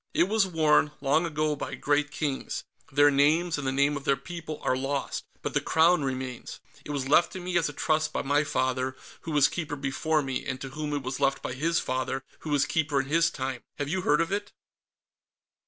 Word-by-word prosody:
It -, -, +5 dB
was 205 Hz, +1 st, +2 dB
worn, 155 Hz, -3 st, +3 dB
long 150 Hz, +5 st, +2 dB
ago, 155 Hz, -1 st, 0 dB
by -, -, -5 dB
great 145 Hz, 0 st, +1 dB
kings. 145 Hz, -3 st, -3 dB, 0.3 s
Their 145 Hz, +1 st, +5 dB
names, 155 Hz, +4 st, +3 dB
and 135 Hz, -, -3 dB
the -, -, +1 dB
name 140 Hz, +2 st, +2 dB
of 140 Hz, -, -5 dB
their 140 Hz, 0 st, +2 dB
people, 165 Hz, -3 st, -7 dB
are -, -, +2 dB
lost, 135 Hz, +1 st, -2 dB, 0.2 s
but -, -, -3 dB
the -, -, +2 dB
Crown 165 Hz, 0 st, +4 dB
remains. 130 Hz, -2 st, -4 dB, 0.2 s
It -, -, -11 dB
was 140 Hz, -3 st, -2 dB
left 155 Hz, +4 st, +4 dB
to 185 Hz, -, -5 dB
me 180 Hz, 0 st, -4 dB
as 165 Hz, -3 st, +2 dB
a -, -, -7 dB
trust 155 Hz, +1 st, 0 dB
by -, -, -2 dB
my 145 Hz, +2 st, +2 dB
father, 130 Hz, -2 st, -1 dB, 0.3 s
who 165 Hz, -, -6 dB
was 145 Hz, -2 st, +5 dB
Keeper 155 Hz, -3 st, -4 dB
before 145 Hz, +2 st, 0 dB
me 135 Hz, -1 st, -3 dB
and 130 Hz, -, -4 dB
to 135 Hz, -, -6 dB
whom 150 Hz, +2 st, -4 dB
it 145 Hz, -2 st, -2 dB
was 130 Hz, 0 st, -4 dB
left 135 Hz, 0 st, +1 dB
by -, -, -3 dB
his 165 Hz, +6 st, +1 dB
father, 130 Hz, +1 st, -2 dB, 0.2 s
who 155 Hz, -, -7 dB
was 145 Hz, -2 st, +3 dB
Keeper 150 Hz, -3 st, 0 dB
in 135 Hz, -, -9 dB
his 165 Hz, +2 st, +4 dB
time. 130 Hz, -4 st, -4 dB, 0.2 s
Have 145 Hz, -1 st, -3 dB
you 185 Hz, +3 st, 0 dB
heard 150 Hz, -2 st, +3 dB
of 165 Hz, -, -1 dB
it?" 205 Hz, +1 st, -2 dB
145 Hz, 220 wpm, -27 LUFS, 135-160 Hz, 0.3 s, It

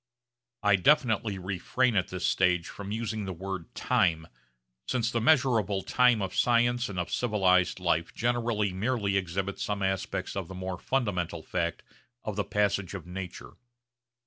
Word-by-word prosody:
I 105 Hz, -1 st, +5 dB
definitely 110 Hz, -3 st, +2 dB
refrain 100 Hz, +6 st, 0 dB
at 95 Hz, -2 st, +2 dB
this 95 Hz, -1 st, -4 dB
stage 90 Hz, -2 st, +2 dB
from 100 Hz, 0 st, -7 dB
using 110 Hz, -1 st, -3 dB
the 95 Hz, -, -4 dB
word 95 Hz, 0 st, -5 dB
'time,' 85 Hz, -10 st, +1 dB, 0.6 s
since 120 Hz, -2 st, 0 dB
the 115 Hz, -, 0 dB
measurable 115 Hz, -8 st, +3 dB
time 125 Hz, -4 st, +3 dB
of 95 Hz, -, -4 dB
science 120 Hz, 0 st, +2 dB
and 95 Hz, -, -6 dB
of 90 Hz, -1 st, -2 dB
civilised 95 Hz, -6 st, +2 dB
life 85 Hz, -2 st, 0 dB
generally 115 Hz, -4 st, 0 dB
merely 100 Hz, 0 st, 0 dB
exhibits 95 Hz, +1 st, -2 dB
some 100 Hz, -1 st, -2 dB
aspects 95 Hz, 0 st, -2 dB
of 95 Hz, -4 st, -3 dB
the 95 Hz, -, -8 dB
more 95 Hz, 0 st, -4 dB
fundamental 100 Hz, -11 st, -1 dB
fact 85 Hz, -2 st, -2 dB, 0.4 s
of 110 Hz, -, -4 dB
the 105 Hz, -, 0 dB
passage 100 Hz, -1 st, 0 dB
of 90 Hz, -, -7 dB
nature. 90 Hz, 0 st, -8 dB
100 Hz, 150 wpm, -28 LUFS, 90-115 Hz, 0.6 s, I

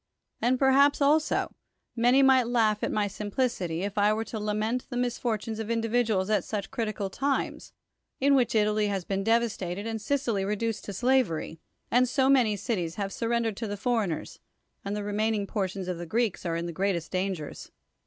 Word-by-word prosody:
And 250 Hz, +2 st, +2 dB
perhaps, 275 Hz, +2 st, +4 dB
also, 300 Hz, +2 st, +2 dB, 0.4 s
many 245 Hz, +3 st, +4 dB
might 260 Hz, -3 st, +5 dB
laugh 220 Hz, -3 st, +2 dB
at -, -, 0 dB
my 210 Hz, -1 st, +1 dB
simplicity, 205 Hz, -5 st, -2 dB
if 205 Hz, +1 st, -2 dB
I 205 Hz, +1 st, +4 dB
were 220 Hz, +1 st, -1 dB
to 225 Hz, 0 st, -6 dB
lament 215 Hz, +4 st, -1 dB
the 245 Hz, -, -4 dB
misfortunes 235 Hz, -3 st, -2 dB
of 220 Hz, 0 st, -4 dB
individuals 225 Hz, -4 st, +1 dB
at 215 Hz, -, +2 dB
such 205 Hz, -3 st, -4 dB
critical 215 Hz, -4 st, -3 dB
times, 275 Hz, +6 st, -2 dB, 0.5 s
in 280 Hz, +1 st, +4 dB
Avhich 250 Hz, -4 st, +2 dB
Italy 210 Hz, 0 st, +2 dB
has 195 Hz, -3 st, -2 dB
been 195 Hz, 0 st, -2 dB
devastated, 215 Hz, -4 st, 0 dB
and 225 Hz, -1 st, -3 dB
Sicily 235 Hz, -5 st, 0 dB
reduced 210 Hz, +2 st, -2 dB
to 200 Hz, -, -5 dB
slavery, 220 Hz, -9 st, +1 dB, 0.3 s
and 245 Hz, +1 st, +4 dB
so 265 Hz, 0 st, +2 dB
many 245 Hz, -6 st, +4 dB
cities 180 Hz, -6 st, -2 dB
have 200 Hz, -1 st, -3 dB
been -, -, -7 dB
surrendered 230 Hz, -2 st, 0 dB
to 225 Hz, -, -3 dB
the 205 Hz, 0 st, -4 dB
foreigners, 215 Hz, -7 st, -2 dB, 0.4 s
and 200 Hz, +1 st, -3 dB
the 210 Hz, -, -3 dB
remaining 210 Hz, 0 st, 0 dB
portions 195 Hz, -2 st, -3 dB
of 180 Hz, -2 st, -3 dB
the 175 Hz, -, -6 dB
Greeks 220 Hz, -2 st, -1 dB
are 165 Hz, -, -1 dB
in 170 Hz, +1 st, -2 dB
the 170 Hz, -, -4 dB
greatest 180 Hz, -2 st, -1 dB
dangers. 185 Hz, -5 st, -3 dB
215 Hz, 185 wpm, -28 LUFS, 195-240 Hz, 0.5 s, might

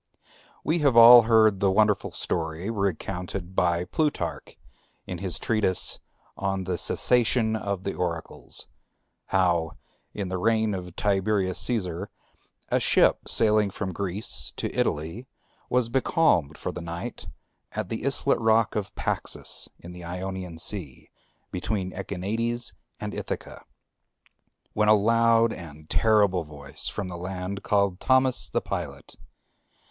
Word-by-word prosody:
We 165 Hz, +2 st, +1 dB
have 140 Hz, -6 st, +3 dB
all 120 Hz, +1 st, +11 dB
heard 110 Hz, -3 st, +5 dB
the 100 Hz, -, +3 dB
wonderful 105 Hz, +1 st, +2 dB
story, 80 Hz, +5 st, -3 dB
recounted 95 Hz, -2 st, -3 dB
by 85 Hz, -1 st, +2 dB
Plutarch 150 Hz, -, -2 dB, 0.5 s
in -, -, -6 dB
his -, -, -2 dB
treatise 110 Hz, -5 st, +1 dB, 0.4 s
on 95 Hz, -1 st, -2 dB
the 90 Hz, -2 st, -2 dB
Cessation 120 Hz, -2 st, +3 dB
of 100 Hz, -3 st, -3 dB
the 100 Hz, -, -2 dB
Oracles, 85 Hz, -2 st, -4 dB, 0.6 s
how, 85 Hz, -4 st, +1 dB, 0.4 s
in 100 Hz, -3 st, -4 dB
the 95 Hz, 0 st, -2 dB
reign 110 Hz, +1 st, +2 dB
of 90 Hz, -2 st, -6 dB
Tiberius 100 Hz, -2 st, +1 dB
Cæsar, 95 Hz, -6 st, -2 dB, 0.6 s
a -, -, +2 dB
ship -, -, +3 dB
sailing 105 Hz, -2 st, +3 dB
from 95 Hz, -1 st, -4 dB
Greece 100 Hz, +3 st, -2 dB
to -, -, -4 dB
Italy 85 Hz, -, -2 dB, 0.4 s
was 125 Hz, -2 st, +2 dB
becalmed 115 Hz, -, +2 dB
for -, -, -4 dB
the -, -, -7 dB
night 85 Hz, +1 st, -6 dB, 0.5 s
at -, -, -4 dB
the -, -, -4 dB
islet -, -, +1 dB
rock 115 Hz, 0 st, +3 dB
of 105 Hz, -2 st, -3 dB
Paxus -, -, -2 dB
in 85 Hz, -, -11 dB
the 90 Hz, 0 st, -10 dB
Ionian 90 Hz, 0 st, -5 dB
Sea, 80 Hz, -, -3 dB, 0.4 s
between 95 Hz, 0 st, -2 dB
the -, -, -11 dB
Echinades 115 Hz, +5 st, -2 dB, 0.3 s
and -, -, -5 dB
Ithaca, -, -, -6 dB, 1.1 s
when 105 Hz, 0 st, +2 dB
a 110 Hz, -, +8 dB
loud 115 Hz, +2 st, +3 dB
and 80 Hz, -3 st, -10 dB
terrible 100 Hz, -5 st, +3 dB
voice 75 Hz, -2 st, -6 dB
from 100 Hz, -3 st, -3 dB
the 90 Hz, -1 st, -6 dB
land 95 Hz, +2 st, -5 dB
called 100 Hz, -3 st, +1 dB
Thamous 130 Hz, -1 st, +2 dB
the -, -, 0 dB
pilot. -, -, -6 dB
100 Hz, 130 wpm, -26 LUFS, 90-110 Hz, 1.1 s, all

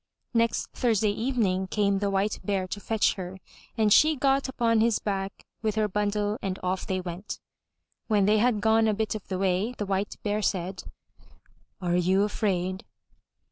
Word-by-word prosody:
Next 230 Hz, -1 st, +2 dB
Thursday 220 Hz, -4 st, +2 dB
evening 205 Hz, -5 st, 0 dB
came 200 Hz, 0 st, +1 dB
the 200 Hz, 0 st, 0 dB
White 195 Hz, +2 st, 0 dB
Bear 195 Hz, -3 st, -1 dB
to 205 Hz, -, -4 dB
fetch 220 Hz, +1 st, +1 dB
her, 185 Hz, 0 st, -7 dB, 0.4 s
and 215 Hz, -2 st, +4 dB
she 310 Hz, 0 st, +6 dB
got 270 Hz, 0 st, +1 dB
upon 230 Hz, -3 st, +2 dB
his 230 Hz, -1 st, +3 dB
back 195 Hz, -1 st, -4 dB, 0.2 s
with 215 Hz, -1 st, -1 dB
her 215 Hz, -1 st, +2 dB
bundle 210 Hz, +1 st, -1 dB
and 190 Hz, -1 st, -2 dB
off 185 Hz, 0 st, -2 dB
they 190 Hz, -1 st, -1 dB
went. 180 Hz, +2 st, -6 dB, 0.7 s
When 210 Hz, -3 st, +3 dB
they 210 Hz, +1 st, +4 dB
had 225 Hz, -2 st, +2 dB
gone 220 Hz, +1 st, +4 dB
a 215 Hz, -, +2 dB
bit 220 Hz, +1 st, -1 dB
of 215 Hz, -, -7 dB
the 190 Hz, -, -2 dB
way, 195 Hz, +5 st, 0 dB
the 205 Hz, -, -2 dB
White 195 Hz, +1 st, -2 dB
Bear 210 Hz, 0 st, 0 dB
said: 190 Hz, -1 st, -2 dB, 0.9 s
"Are 175 Hz, -2 st, 0 dB
you 185 Hz, +3 st, +3 dB
afraid?" 190 Hz, -3 st, -1 dB
205 Hz, 175 wpm, -27 LUFS, 190-220 Hz, 0.9 s, she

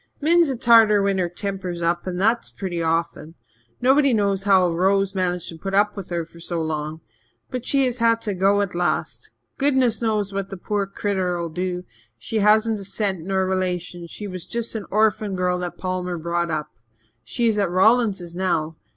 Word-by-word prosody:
Min's 335 Hz, +1 st, +4 dB
a 265 Hz, -, -2 dB
Tartar 225 Hz, -4 st, +5 dB
when 195 Hz, -1 st, +1 dB
her 175 Hz, -1 st, 0 dB
temper's 185 Hz, -2 st, -4 dB
up 170 Hz, +2 st, 0 dB
and 180 Hz, -1 st, -3 dB
that's 225 Hz, +4 st, +1 dB
pretty 175 Hz, -4 st, -4 dB
often. 165 Hz, 0 st, -2 dB, 0.5 s
Nobody 265 Hz, 0 st, +4 dB
knows 200 Hz, -2 st, 0 dB
how 190 Hz, -3 st, +5 dB
Rose 195 Hz, +3 st, +1 dB
managed 180 Hz, -2 st, -1 dB
to 165 Hz, -, -9 dB
put 195 Hz, +2 st, -3 dB
up 205 Hz, +1 st, +3 dB
with 195 Hz, -3 st, -7 dB
her 170 Hz, -2 st, -2 dB
so 170 Hz, 0 st, -3 dB
long. 155 Hz, 0 st, -3 dB, 0.5 s
But 255 Hz, -2 st, -4 dB
she 275 Hz, -1 st, +3 dB
has 250 Hz, -1 st, -2 dB
had 230 Hz, 0 st, +3 dB
to 210 Hz, -, -2 dB
go 195 Hz, +2 st, +3 dB
at 200 Hz, -2 st, -2 dB
last. 175 Hz, 0 st, -2 dB, 0.3 s
Goodness 265 Hz, -5 st, +2 dB
knows 210 Hz, -3 st, 0 dB
what 195 Hz, 0 st, -3 dB
the 195 Hz, -, -7 dB
poor 200 Hz, +2 st, -2 dB
critter'll 185 Hz, -4 st, -2 dB
do. 180 Hz, +2 st, -3 dB, 0.3 s
She 225 Hz, -, -4 dB
hasn't 215 Hz, +1 st, +3 dB
a -, -, -7 dB
cent 195 Hz, -1 st, -1 dB
nor 190 Hz, +2 st, 0 dB
a -, -, 0 dB
relation 180 Hz, -2 st, -2 dB
she 210 Hz, -, -7 dB
was 185 Hz, -3 st, -7 dB
just 235 Hz, -1 st, -3 dB
an 215 Hz, -3 st, -5 dB
orphan 215 Hz, -1 st, +1 dB
girl 180 Hz, 0 st, 0 dB
that 175 Hz, -1 st, -5 dB
Palmer 180 Hz, -1 st, -3 dB
brought 170 Hz, +1 st, -1 dB
up. 150 Hz, -1 st, -3 dB, 0.5 s
She 240 Hz, -2 st, -1 dB
is 215 Hz, -2 st, +1 dB
at 200 Hz, -3 st, +1 dB
Rawlingses 190 Hz, -2 st, +2 dB
now. 160 Hz, -4 st, -1 dB
190 Hz, 190 wpm, -22 LUFS, 175-215 Hz, 0.5 s, Tartar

